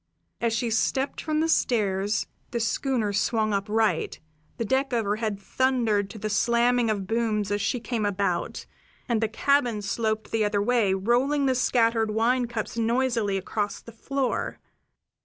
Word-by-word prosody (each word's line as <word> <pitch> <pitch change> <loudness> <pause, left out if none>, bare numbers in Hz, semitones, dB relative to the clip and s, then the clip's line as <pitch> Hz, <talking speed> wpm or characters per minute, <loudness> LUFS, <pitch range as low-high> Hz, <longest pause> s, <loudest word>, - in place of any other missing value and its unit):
As 235 - +1
she 230 +1 -1
stepped 265 +5 0
from 310 -1 0
the 325 - +2
stairs 210 -8 +1 0.2
the 235 - -2
schooner 230 -1 0
swung 215 +1 +1
upright, 210 -3 0 0.4
the 230 - -2
deck 265 +3 0
overhead 215 -2 -1
thundered 225 -3 +1
to 220 - -9
the 215 +1 -3
slamming 235 +2 +2
of 205 -3 -1
booms 215 -2 0
as 205 0 0
she 245 +5 0
came 235 -1 -2
about, 200 -1 -1 0.4
and 235 -3 +1
then 220 - +2
the 220 - -18
cabin 265 -6 +2
sloped 220 +1 -2
the 225 -1 +1
other 205 -1 +1
way, 210 -3 +2
rolling 250 +8 +1
the 260 - +3
scattered 230 -3 +2
wine 240 +3 +1
cups 230 0 -4
noisily 230 -3 +1
across 205 +2 -3
the 230 - -12
floor. 265 +3 -2
225 Hz, 155 wpm, -26 LUFS, 210-245 Hz, 0.4 s, the